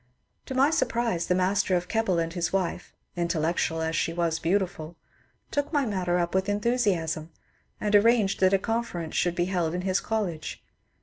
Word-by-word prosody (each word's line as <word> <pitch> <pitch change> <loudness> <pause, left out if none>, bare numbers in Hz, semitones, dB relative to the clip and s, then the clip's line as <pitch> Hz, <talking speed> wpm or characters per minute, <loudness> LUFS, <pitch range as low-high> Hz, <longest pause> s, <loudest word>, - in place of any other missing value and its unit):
To 265 - -4
my 275 +3 +4
surprise 235 - 0
the 180 - +2
master 185 +1 +2
of 175 0 -1
Keble 220 -4 +1
and 165 0 -1
his 175 -2 -1
wife 190 -3 -2 0.2
(intellectual 165 -1 0
as 160 0 -1
she 165 - 0
was 165 -1 0
beautiful) 175 -2 -1 0.6
took 285 +1 -1
my 290 -4 +2
matter 185 -5 0
up 170 -1 -1
with 190 +1 +1
enthusiasm, 205 -8 0 0.5
and 210 0 +1
arranged 215 -1 +4
that 185 0 +4
a 195 - +5
conference 210 -6 -3
should 175 -1 +1
be 175 0 +1
held 175 -3 -1
in 180 - -2
his 185 0 +1
college. 185 -9 -3
185 Hz, 175 wpm, -27 LUFS, 170-210 Hz, 0.6 s, a